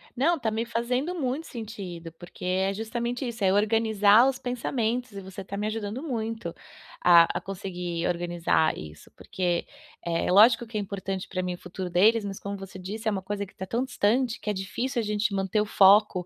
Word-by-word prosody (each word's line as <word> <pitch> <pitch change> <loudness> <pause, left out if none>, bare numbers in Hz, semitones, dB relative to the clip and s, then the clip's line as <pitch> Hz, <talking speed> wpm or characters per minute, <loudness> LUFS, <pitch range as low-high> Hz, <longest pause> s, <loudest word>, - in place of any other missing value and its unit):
Não, 320 +6 +2
tá 225 - 0
me 225 +2 -1
fazendo 250 +8 -1
muito 280 0 -2
sentido, 195 -8 -7
porque 175 +2 -11
é 190 +2 +1
justamente 235 +4 -3
isso, 230 -3 -5
é 190 -1 +4
organizar 215 +1 +4
os 270 -1 0
pensamentos 245 -1 -2
e 200 -1 -7
você 190 0 -8
tá 200 +1 -6
me 210 +1 -1
ajudando 215 +2 -4
muito 225 - -3 0.5
a 170 -1 +8
a - - -4
conseguir 180 -3 -4
organizar 175 -2 +1
isso, 75 -1 -11
porque, 175 -2 -2 0.4
é, 170 +1 0
lógico 225 +5 +6
que 220 -1 -5
é - - 0
importante 195 -1 -4
pra 185 - -3
mim 180 0 -2
o - - -14
futuro 180 +1 -6
deles, 215 +6 +4
mas 195 -1 -5
como 200 0 -5
você 195 -1 -9
disse, 210 +5 -6
é - - +3
uma 195 -2 -2
coisa 200 +2 -4
que 195 - -20
tá 190 - -5
tão 235 +6 -1
distante 245 -1 +1
que - - -5
é - - +1
difícil 220 +7 -3
a - - -4
gente 210 0 0
manter 195 +1 +1
o - - 0
foco. 200 -2 +5
205 Hz, 205 wpm, -27 LUFS, 185-230 Hz, 0.5 s, a